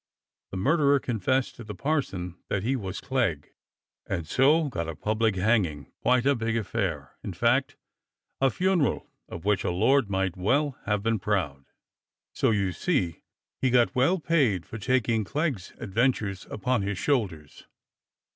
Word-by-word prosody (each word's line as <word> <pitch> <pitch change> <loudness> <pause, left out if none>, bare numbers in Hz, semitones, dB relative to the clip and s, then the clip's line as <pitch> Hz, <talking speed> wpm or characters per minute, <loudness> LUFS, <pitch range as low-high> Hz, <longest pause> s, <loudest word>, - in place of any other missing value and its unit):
The 95 - -6
murderer 140 - +3
confessed 125 +2 0
to 120 - -8
the 105 -2 -7
parson 95 - -2
that 95 - -1
he 130 +5 +1
was 95 -6 -4
Clegg, 115 - -1 0.5
and 85 - -2
so 150 - +4
got 85 - -3
a 80 - -5
public 110 +2 0
hanging, 90 - +1
quite 125 0 +3
a 140 - +5
big 115 -2 -1
affair, 90 - -3
in - - -5
fact, - - +1 0.6
a 135 - +4
funeral 180 -1 0 0.2
of 85 - -8
which 105 -2 +2
a - - 0
lord 110 +7 +3
might 95 -2 0
well 135 +9 +1
have 105 -1 0
been 115 -1 +1
proud. 85 -9 -1 0.7
So - - +2
you 100 -4 +1
see 90 - -1 0.4
he 130 - +3
got 120 -1 +3
well 135 +9 +3
paid 140 - +1
for 110 - -8
taking 115 -1 +1
Clegg's 140 - -2
adventures 105 -2 -1
upon 125 +1 0
his 100 0 -2
shoulders. 95 - -2
110 Hz, 155 wpm, -27 LUFS, 95-130 Hz, 0.7 s, a